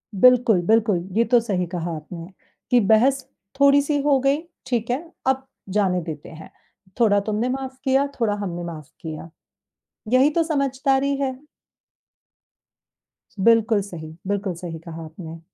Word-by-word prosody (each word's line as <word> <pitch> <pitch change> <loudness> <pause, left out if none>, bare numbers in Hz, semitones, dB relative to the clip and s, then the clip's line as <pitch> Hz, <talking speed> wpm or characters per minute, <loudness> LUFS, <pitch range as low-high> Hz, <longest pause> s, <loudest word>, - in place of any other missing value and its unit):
बिल्कुल, 240 -2 +5
बिल्कुल। 220 -3 +3 0.2
ये 230 - +5
तो 245 - +7
सही 200 -6 -1
कहा 170 -1 -4
आपने 165 +2 -8 0.4
कि 245 - +6
बहस 240 +6 +3 0.3
थोड़ी-सी 285 +1 +4
हो 280 -1 +3
गई, 275 +2 +2 0.3
ठीक 240 -3 -2
है? 320 +7 -4
अब 265 0 +1 0.3
जाने 190 -3 +1
देते 155 -3 -7
हैं, 160 0 -12 0.5
थोड़ा 210 -4 +4
तुमने 215 +4 -1
माफ़ 260 0 -4
किया, 270 +1 +2
थोड़ा 225 -3 +1
हमने 180 -4 -4
माफ़ 155 -4 -8
किया, 160 0 -7 0.8
यही 260 +3 +5
तो 330 +2 +1
समझदारी 275 -2 +1
है। 270 -1 0 2.1
बिल्कुल 225 -2 +4
सही। 160 -4 -9
बिल्कुल 200 -1 -1
सही 165 -2 -6
कहा 165 -1 -7
आपने। 165 +1 -9
225 Hz, 140 wpm, -23 LUFS, 175-265 Hz, 2.1 s, तो